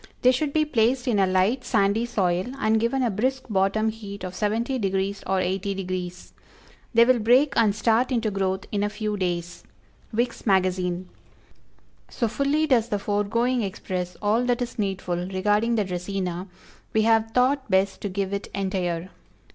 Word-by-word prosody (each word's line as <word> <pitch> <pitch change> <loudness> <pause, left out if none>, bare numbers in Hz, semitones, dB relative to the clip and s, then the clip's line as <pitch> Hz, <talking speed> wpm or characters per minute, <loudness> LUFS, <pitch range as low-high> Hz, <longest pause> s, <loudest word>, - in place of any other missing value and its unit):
They 250 - +7
should 280 +3 -1
be 310 +1 +2
placed 245 -2 +1
in 220 -5 +2
a 190 - +4
light, 190 +8 +2
sandy 220 +1 +1
soil, 185 -5 0
and 220 -3 +2
given 240 +4 0
a 240 - +1
brisk 260 +6 -1
bottom 200 +3 +2
heat 205 -3 -8
of 185 -1 -5
70° 230 +6 -1 0.5
or 190 - +1
80° 185 +1 -1
degrees. 180 -1 -5 0.6
They 235 -1 +6
will 255 0 +4
break 250 +6 +4
and 215 -3 +3
start 225 +4 +2
into 230 -4 0
growth 190 -1 -1
in 205 - 0
a 205 - +1
few 210 0 -3
days. 175 -2 -3 0.5
Vick's 235 +1 -2
Magazine. 185 -2 +1 1.0
So 235 - -1
fully 280 +6 +1
does 240 -6 +2
the 205 - 0
foregoing 215 +5 0
express 185 -3 -4
all 215 +4 +2
that 245 0 +1
is 240 - -8
needful 190 -3 -1
regarding 210 +5 +1
the 210 -3 +1
Dracæna, 180 0 -3 0.5
we 220 - +3
have 225 0 +3
thought 260 +2 +1
best 190 0 +1
to 205 - -3
give 195 +1 -2
it 200 - -3
entire. 185 -3 -2
210 Hz, 165 wpm, -25 LUFS, 190-235 Hz, 1.0 s, They